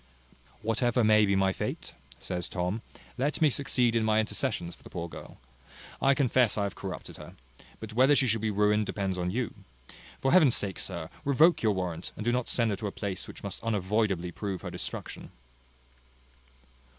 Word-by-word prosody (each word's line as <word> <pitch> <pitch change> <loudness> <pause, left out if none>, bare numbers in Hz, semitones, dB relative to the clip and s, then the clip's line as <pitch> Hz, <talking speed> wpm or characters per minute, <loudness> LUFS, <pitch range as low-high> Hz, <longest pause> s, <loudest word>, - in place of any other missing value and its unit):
"Whatever 120 +2 +2
may 110 -1 +5
be 100 - +2
my 95 0 +2
fate," - - -4 0.3
says 90 -1 -4
Tom, 90 +4 -2 0.4
"let 145 +4 0
me 155 -3 +4
succeed 125 -3 +1
in 115 - +2
my 110 0 +3
intercessions 110 -5 -1
for - - -16
the - - -12
poor 85 -1 -4
girl. - - -11 0.6
I 135 0 +4
confess 125 -5 +3
I 100 - +1
have 100 -1 -2
corrupted 95 -2 -7
her! - - -11 0.4
but 110 0 -8
whether 130 +5 +5
she 135 - +3
shall 115 -3 +1
be 110 - 0
ruined, 105 0 +2
depends 95 -2 -2
on 90 0 -1
you. 120 +5 -2 0.7
For 135 - +1
Heaven's 155 -9 +6
sake, 100 -2 -2
sir, 80 -2 -5
revoke 155 +4 +4
your 110 -2 +3
warrant, 90 -3 -4
and 105 - -6
do 120 - +3
not 125 0 -1
send 115 -3 +1
her 100 - -2
to 105 - -3
a - - -3
place 95 -2 -4
which - - -11
must - - -5
unavoidably 100 -4 0
prove 95 0 -4
her - - -5
destruction." - - -6
110 Hz, 185 wpm, -29 LUFS, 95-120 Hz, 0.7 s, Heaven's